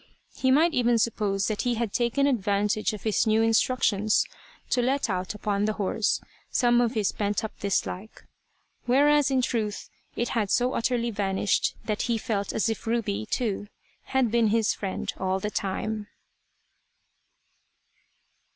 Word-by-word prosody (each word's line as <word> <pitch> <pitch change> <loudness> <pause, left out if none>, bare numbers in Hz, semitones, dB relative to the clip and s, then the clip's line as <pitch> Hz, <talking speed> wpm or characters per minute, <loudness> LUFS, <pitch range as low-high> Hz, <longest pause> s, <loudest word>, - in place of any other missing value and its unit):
He 260 - 0
might 315 +5 +4
even 240 -2 +3
suppose 205 -3 0
that 215 -2 -1
he 245 -2 0
had 230 -2 -2
taken 245 +4 +1
advantage 210 -4 +1
of 210 -2 -8
his 220 +1 +1
new 220 +1 +3
instructions, 225 -2 +2 0.5
to 250 - +3
let 260 -2 0
out 185 +2 -3
upon 205 -1 -1
the 215 - 0
horse 210 +1 0 0.3
some 240 -1 +3
of 240 0 0
his 210 -3 +1
pent 205 +2 -1
up 220 - -6
dislike; 200 +1 -3 0.6
whereas 290 +3 +4
in 260 -2 +1
truth, 220 -4 -2 0.2
it 240 - -1
had 215 -4 0
so 250 +4 +2
utterly 235 0 0
vanished 200 -1 0
that 215 -1 -1
he 235 - +2
felt 215 -3 -2
as 220 - 0
if 225 +1 -3
Ruby, 215 - -1
too, 205 -4 -2 0.4
had 260 -4 +1
been 235 -1 +3
his 220 0 +2
friend 195 -2 -4
all 190 0 0
the 210 +2 -3
time. 210 +2 -3
220 Hz, 150 wpm, -26 LUFS, 205-240 Hz, 0.6 s, might